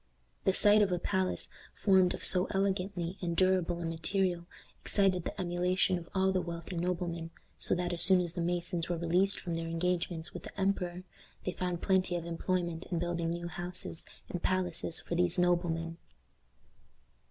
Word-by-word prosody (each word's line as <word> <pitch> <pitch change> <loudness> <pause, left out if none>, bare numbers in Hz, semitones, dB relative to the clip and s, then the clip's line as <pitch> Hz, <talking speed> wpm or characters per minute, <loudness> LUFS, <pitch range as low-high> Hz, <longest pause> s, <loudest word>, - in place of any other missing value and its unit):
The 190 - +4
sight 210 +2 +6
of 200 -2 +3
a 180 - +1
palace 190 +1 0 0.3
formed 190 -3 +4
of - - -10
so 180 0 +5
elegant 195 0 0 0.3
and 170 -2 -2
durable 185 -2 +2
a - - -3
material 175 +1 -1 0.3
excited 190 -4 +2
the - - -5
emulation 180 +1 +1
of 170 - -12
all 190 0 +3
the 185 -1 +1
wealthy 170 +1 -6
noblemen, 170 -1 -2 0.3
so - - +1
that, 175 0 -1
as 170 - +2
soon 185 +1 +7
as 175 -2 -1
the 175 - -3
masons 175 0 -1
were 175 - 0
released 180 +4 +2
from 175 - -4
their 165 0 -3
engagement 170 0 -1
with - - -6
the - - -10
emperor, 185 -2 -1 0.4
they 185 - 0
found 180 -1 -3
plenty 185 -2 +2
of 170 -1 -3
employment 170 0 -2
in 175 - -1
building 170 0 -1
new 170 +1 -3
houses 175 0 -4 0.2
and 175 - -5
palaces 180 -2 -1
for - - -6
these 175 0 +2
noblemen. 170 -2 +1
175 Hz, 175 wpm, -32 LUFS, 170-185 Hz, 0.4 s, soon